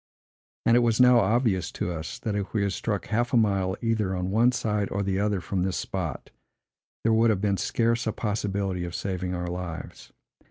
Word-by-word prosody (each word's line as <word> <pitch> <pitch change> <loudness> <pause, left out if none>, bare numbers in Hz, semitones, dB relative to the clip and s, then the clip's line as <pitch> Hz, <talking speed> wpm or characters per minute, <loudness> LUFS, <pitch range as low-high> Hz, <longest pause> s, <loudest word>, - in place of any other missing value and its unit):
And 115 - +5
it - - +6
was 115 -1 +2
now 125 -1 +7
obvious 105 - +1
to 90 - -2
us, 80 -2 -5
that 110 - -3
if 100 +2 -3
we 105 - +2
had 100 -1 0
struck 105 -4 -2
half 120 +3 -1
a - - +5
mile, 100 -3 +1
either 110 -5 0
on 90 +1 -2
one 115 +4 +4
side 105 -4 -1
or 100 +1 -1
the 95 0 0
other 105 -1 +1
from 95 +1 -2
this 95 0 -1
spot, 85 -8 -4 0.7
there 115 - +3
would 115 +1 +4
have 105 -4 +2
been 100 -2 +1
scarce 115 +3 0
a - - +2
possibility 100 -4 -2
of 85 -1 -5
saving 90 -2 -3
our 90 0 -3
lives. 90 -1 -6
100 Hz, 205 wpm, -26 LUFS, 95-115 Hz, 0.7 s, now